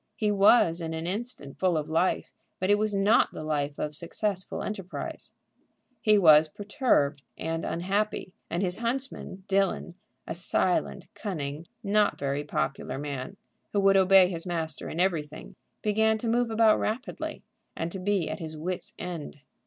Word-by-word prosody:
He 210 -1 +1
was 195 -4 +5
in 160 -1 -3
an 160 +1 -4
instant 190 - -4
full 180 -3 +2
of 150 - -2
life, 165 +4 +1 0.3
but 185 +2 +1
it 205 - +4
was 215 -1 0
not 200 +4 +4
the - - -6
life 145 -2 -1
of 150 0 -3
successful 185 +4 -2
enterprise. 195 -3 -5 0.7
He 215 -1 +5
was 155 -4 +7
perturbed 200 - +1 0.2
and 165 0 -3
unhappy, 195 +2 -1 0.2
and 175 +3 -1
his 180 -1 0
huntsman, 235 -5 -3
Dillon, 195 -2 +1 0.3
a - - -4
silent, 180 +1 0
cunning, 155 -6 -5 0.2
not 210 0 +2
very 140 +1 -2
popular 150 -3 -2
man, 140 +5 -5 0.4
who 205 - +2
would 195 0 +5
obey 190 -1 +7
his 175 -1 -5
master 160 -3 -3
in 165 - -5
everything, 155 -5 -1 0.3
began 220 +1 +3
to 230 - -4
move 240 +1 +2
about 220 -1 +4
rapidly, 235 +6 -3 0.3
and 165 +1 -2
to 190 - -6
be 190 -2 0
at 155 - -4
his 160 -1 -6
wit's 180 +4 -4
end. 165 -5 -6
185 Hz, 160 wpm, -28 LUFS, 160-205 Hz, 0.7 s, was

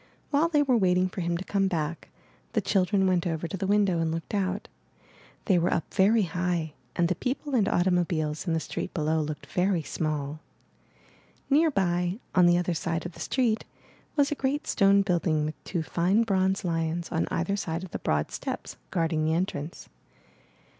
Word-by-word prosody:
"While 300 +3 +3
they 295 -3 +3
were 255 -4 +3
waiting 185 -1 +3
for 185 - -5
him 170 0 0
to 190 - -6
come 195 -1 +1
back, 165 -3 -3 0.4
the - - +3
children 190 0 +2
went 180 -1 +2
over 165 0 -2
to 165 - -5
the 195 0 -2
window 200 -4 +3
and 165 -1 0
looked 165 +4 -5
out. 195 -1 -1 0.8
They 190 -5 +4
were 170 - +1
up 165 - -2
very 210 +3 +4
high 175 -3 -1 0.2
and 175 - +2
the 180 - +1
people 270 - -3
and 220 -6 +3
automobiles 175 -3 0
in 165 - +1
the 160 - +1
street 180 - -5
below 160 -1 +1
looked 150 0 -5
very 180 -2 0
small. 150 -1 -3 1.1
Near 315 +4 +5
by, 180 - 0 0.2
on 180 -2 +6
the 175 0 +5
other 175 0 0
side 165 +1 -2
of 175 - -4
the - - -15
street, 235 -4 0 0.5
was 285 -2 +3
a - - +3
great 280 +1 -1
stone 200 0 +4
building 170 -5 +1
with 155 - -6
two 170 -4 -2
fine 180 +7 +2
bronze 190 -2 +1
lions 165 0 -1
on 165 - 0
either 175 +4 0
side 170 -4 -3
of 185 - -8
the - - -4
broad 75 0 0
steps, - - -5
guard 165 -1 0
ing 155 0 +1
the 160 +1 +2
entrance. 165 -3 -3
180 Hz, 190 wpm, -27 LUFS, 165-195 Hz, 1.1 s, on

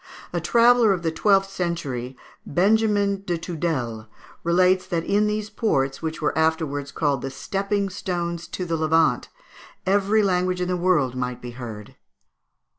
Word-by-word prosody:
A - - -1
traveller 235 -2 +5
of 175 -2 -4
the 165 - 0
twelfth 195 +3 +2
century, 135 -9 -3 0.3
Benjamin 205 +2 +2
de 175 -3 -1
Tudèle, 150 -10 -3 0.4
relates 185 +2 +3
that 170 -2 -1
in 205 +4 +2
these 210 0 -2
ports, 135 - 0
which 160 -1 -4
were - - +1
afterwards 160 -3 0
called 145 -5 0
the 135 - -4
stepping 200 +7 -2
stones 175 -3 -4
to 180 +2 -5
the 165 -1 -1
Levant, 160 +1 +2 0.6
every 200 +2 +3
language 180 -1 +1
in 180 0 -1
the 180 - +1
world 170 -8 +2
might 125 -1 -3
be 120 - -8
heard. 115 -4 -9
175 Hz, 150 wpm, -23 LUFS, 145-195 Hz, 0.6 s, traveller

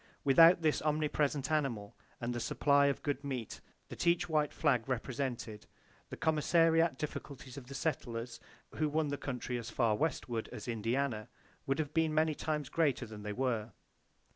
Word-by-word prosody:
Without 165 +5 +7
this 155 -1 +2
omnipresent 150 -1 0
animal, 125 -10 -1 0.2
and 120 0 -2
the 120 - -3
supply 140 +3 +3
of 140 - -1
good 145 -1 -2
meat 130 -6 -5 0.3
that - - -4
each 170 0 +3
white 155 -3 +1
flag 135 -6 +1
represented, 125 -3 -3 0.4
the - - -7
commissariat 165 0 +3
difficulties 140 -3 -6
of 135 -3 -9
the 140 - -8
settlers 125 -6 -3 0.4
who 155 0 +1
won 155 0 0
the 145 - -2
country 125 -2 -3
as 115 0 -6
far 115 -4 +2
westward 120 -5 -2
as 120 -2 -8
Indiana 115 0 -1 0.4
would 135 +1 +1
have 155 -2 -2
been 160 -1 +2
many 155 0 +3
times 150 -1 -2
greater 150 -4 +1
than 110 -1 -9
they 105 0 -4
were. 120 -3 -1
140 Hz, 165 wpm, -33 LUFS, 120-155 Hz, 0.4 s, Without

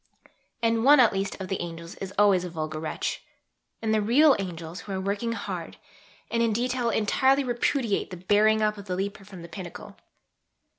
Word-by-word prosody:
And 230 0 +2
one 290 +2 +7
at 235 -4 +5
least 195 +1 -3
of 190 - -5
the 190 - -3
"angels" 170 -1 -7
is 195 -1 -6
always 200 -3 +4
a 180 - -4
vulgar 155 -2 -4
wretch. 155 0 -3 0.6
And 220 -1 +1
the 215 - +2
real 270 +7 +5
"angels" 170 -2 -6
who 205 - -9
are 190 - -2
working 200 +4 -2
hard, - - -6 0.5
and 230 - +1
in 230 -2 +2
detail 245 +1 0
entirely 265 +6 +2
repudiate 240 -2 0
the 180 - -7
"bearing 210 +4 +3
up" 210 -1 0
of 200 - -10
the 185 -2 -3
leaper 195 +1 -4
from 190 -3 -11
the - - -8
pinnacle.... 175 +1 -9
205 Hz, 190 wpm, -26 LUFS, 180-230 Hz, 0.6 s, one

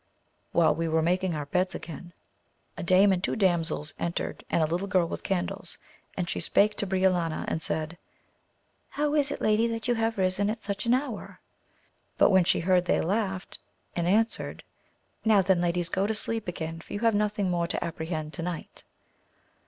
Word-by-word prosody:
While 160 -3 +4
we 165 +2 -2
were 160 0 +2
making 180 +1 +1
our 150 -1 -3
beds 180 +5 0
again, 175 +2 -8 0.6
a - - -6
dame 190 +3 +5
and 185 -1 0
two - - 0
damsels 170 -6 +1
entered 170 0 -3
and 165 - +2
a - - +4
little 175 +5 -2
girl 185 -3 +3
with - - -5
candles, 180 -2 -3 0.4
and 180 -2 -1
she - - -2
spake 210 +1 +3
to 200 - -1
Briolania 185 -4 +1
and 160 - -1
said. 160 +3 -3 0.9
How 295 0 -1
is 290 -2 +3
it - - -4
lady 215 +2 +3
that 230 -1 -3
you 245 - +3
have 225 -1 0
risen 190 +2 +1
at 220 0 -4
such 200 +2 -3
an 240 - +5
hour? 255 -5 -4 0.8
but - - +5
when 190 -2 +5
she - - +2
heard 180 0 +3
they - - +2
laughed 195 0 -2 0.4
and 170 -1 0
answered, 220 +5 0 0.6
Now 215 -3 +5
then 185 -1 +3
ladies 175 0 0
go 195 +3 0
to 220 - -1
sleep 225 0 -2
again, 165 -1 -4
for - - -11
you 205 - -3
have 230 -1 +4
nothing 205 -2 +1
more 170 -1 0
to - - -2
apprehend 160 -1 -4
to 170 - -5
night. 170 -1 -3
185 Hz, 190 wpm, -28 LUFS, 170-210 Hz, 0.9 s, dame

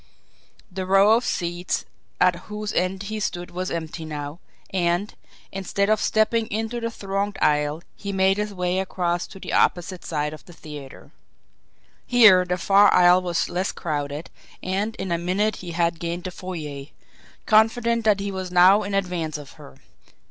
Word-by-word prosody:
The 185 0 -4
row 195 +3 +6
of 235 - 0
seats 175 -2 -2 0.3
at 180 -1 +4
whose 210 0 -4
end 185 +2 -1
he 215 +2 -4
stood 175 -3 -4
was 185 +1 -3
empty 165 0 -5
now, 150 0 -6 0.3
and, 180 +2 0 0.4
instead 200 +2 -1
of 215 - +2
stepping 220 +1 +2
into 225 +3 -3
the 230 0 -2
thronged 200 -2 -3
aisle, 150 +2 +1
he 200 - -5
made 190 0 +2
his 210 0 -2
way 180 -1 -1
across 175 -2 -1
to 195 - -12
the - - -6
opposite 175 +1 +1
side 150 -1 -2
of 155 - -11
the 175 - -14
theatre. 145 -4 -11 1.0
Here, 220 -7 +7
the 180 0 -1
far 200 +3 +5
aisle 180 0 +6
was 175 -2 -1
less 185 +2 -2
crowded, 145 -1 -4 0.3
and 200 +4 -2
in 190 -4 -5
a 170 - +1
minute 195 +5 0
he 180 - -8
had 170 0 0
gained 170 +1 -4
the 185 - -5
foyer, 155 -7 -6 0.6
confident 230 +2 +3
that 210 -2 +3
he 200 0 -3
was 190 -1 -5
now 180 +3 +6
in 200 -1 -3
advance 180 -5 -2
of 145 -2 -11
her. 65 - -14
185 Hz, 170 wpm, -23 LUFS, 170-200 Hz, 1.0 s, Here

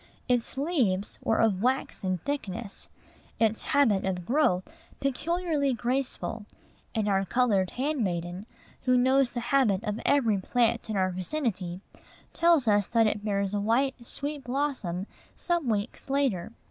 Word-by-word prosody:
Its 245 0 0
leaves 255 - 0
were 225 - +2
of 205 -4 +2
waxen 230 -7 0
thickness, 230 -7 -4 0.5
its 225 -1 +2
habit 225 -9 +3
of 180 -2 -2
growth 230 - +2 0.4
peculiarly 295 +1 0
graceful; 240 -3 -2 0.5
and 215 -2 0
our 195 -1 +2
colored 200 -3 +2
handmaiden, 195 - -2 0.4
who 255 -1 +4
knows 260 +1 +3
the 245 - -2
habits 220 -8 +3
of 210 +1 -2
every 230 -8 +3
plant 235 +3 +1
in 215 - -1
our 185 -1 +2
vicinity, 185 - -3 0.5
tells 335 -6 +4
us 205 -2 +3
that 230 -1 +3
it 210 -1 0
bears 200 -1 -1
a 205 - +1
white, 250 +6 +2
sweet 285 +3 -4
blossom, 245 -9 -2 0.3
some 345 -7 -1
weeks 215 +4 -2
later. 260 -10 0
230 Hz, 135 wpm, -28 LUFS, 195-275 Hz, 0.5 s, who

